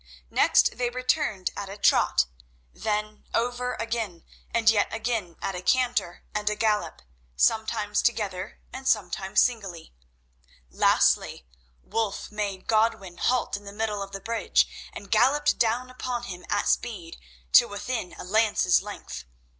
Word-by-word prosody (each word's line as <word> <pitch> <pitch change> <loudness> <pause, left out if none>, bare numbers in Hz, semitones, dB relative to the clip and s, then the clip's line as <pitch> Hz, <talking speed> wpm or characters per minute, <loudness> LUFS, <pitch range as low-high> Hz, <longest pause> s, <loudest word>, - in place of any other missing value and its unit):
Next - - +4
they 245 -1 +1
returned 250 - 0
at 200 -1 -5
a 200 - -8
trot, 130 - +4 0.5
then 215 0 -3
over 245 +1 -1
again, 225 -7 -3 0.3
and 230 -1 -1
yet 220 -2 +4
again 225 -6 -2
at 195 - -1
a 180 - -5
canter 245 -5 +1
and 210 0 0
a 210 - -1
gallop, 210 -1 0 0.3
sometimes 220 - +1
together 200 -6 -2
and 265 +1 -6
sometimes 195 -2 +2
singly. 195 - -3 0.8
Lastly, - - +2 0.4
Wulf 220 -3 -2
made 205 -3 -3
Godwin 215 -5 +1
halt 250 -1 +1
in 205 0 -9
the 200 - -7
middle 210 -1 -2
of 195 0 -6
the 195 - -6
bridge 230 +3 +1 0.2
and 200 - -10
galloped 290 +7 +3
down 240 +2 +1
upon 250 -1 -4
him 180 -6 -8
at 205 - 0
speed, 185 -8 -1 0.3
till - - +7
within 205 -1 -4
a - - -7
lance's 205 -1 +3
length. 205 - -8
215 Hz, 140 wpm, -26 LUFS, 195-235 Hz, 0.8 s, till